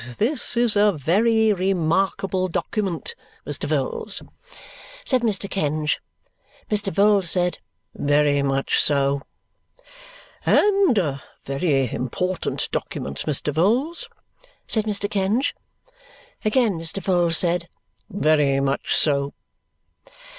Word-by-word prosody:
But 120 - -11
this 245 +1 -1
is 235 -3 +3
a 205 0 +4
very 215 - +2
remarkable 185 +1 0
document, 195 - -3 0.3
Mr. - - -4
Vholes," 470 -2 -2 0.8
said 255 -2 +2
Mr. 205 -4 +1
Kenge. 155 -5 -1 0.7
Mr. 205 -2 +1
Vholes 200 0 +3
said, 180 +1 +1 0.3
"Very 145 0 +2
much 135 0 +1
so." 140 -1 +2 1.2
"And 395 - +3
a 145 -8 0 0.2
very 135 -2 0
important 180 +8 -2
document, 70 0 -4
Mr. 150 0 -1
Vholes," 255 - +1 0.6
said 220 -2 -1
Mr. 205 -1 0
Kenge. 205 +7 0 0.9
Again 215 -4 +2
Mr. 165 +4 -1
Vholes 175 -3 +2
said, 175 -1 +1 0.4
"Very 150 -6 +2
much 135 0 0
so." 140 -2 +1
185 Hz, 105 wpm, -22 LUFS, 150-210 Hz, 1.2 s, a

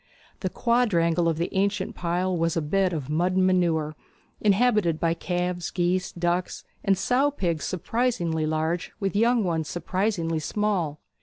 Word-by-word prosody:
The - - -2
quadrangle 175 -9 +2
of 160 - -1
the 170 - -2
ancient 200 +1 0
pile 180 +2 -1
was 165 0 0
a - - +1
bed 185 +4 +1
of 150 -6 -4
mud 170 +5 +1
and 185 0 +4
manure, 165 -4 +1 0.4
inhabited 210 -6 +3
by 165 -1 +2
calves, 175 0 -2
geese, 180 +1 0
ducks, 175 +1 -2 0.2
and 195 -1 +3
sow 250 +9 +2
pigs 170 - -2
surprisingly 180 -5 -1
large, 160 +2 -1
with 195 -1 -2
young 230 +2 +3
ones 165 -4 -1
surprisingly 175 -1 -1
small. 175 -4 -1
175 Hz, 150 wpm, -25 LUFS, 165-195 Hz, 0.4 s, and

